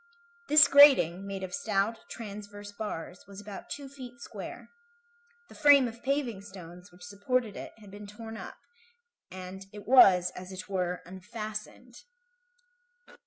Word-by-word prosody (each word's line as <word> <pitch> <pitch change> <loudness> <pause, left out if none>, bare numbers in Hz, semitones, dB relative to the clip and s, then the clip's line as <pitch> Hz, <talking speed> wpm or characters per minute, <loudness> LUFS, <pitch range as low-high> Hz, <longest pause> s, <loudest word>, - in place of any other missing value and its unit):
This 295 -1 +7
grating, 225 - +6
made 195 -1 -5
of 185 - -6
stout, 220 -4 -1
transverse 205 -2 -9
bars, 200 -4 -7
was 200 0 -11
about 205 -1 -10
two 280 -1 -6
feet 265 -2 -11
square. 285 - -9 0.8
The - - -15
frame 285 -3 +6
of 230 0 -10
paving 265 -7 -1
stones 180 -2 -12
which 180 0 -17
supported 210 +3 -1
it - - -8
had 205 -3 -15
been 205 +1 -10
torn 225 +2 -9
up, - - -8 0.8
and 185 +1 -9
it 205 -1 -11
was, 185 -8 +6
as 185 +1 -10
it 185 -1 -8
were, 180 -2 -2
unfastened. 215 +6 -8
205 Hz, 140 wpm, -29 LUFS, 190-240 Hz, 0.8 s, This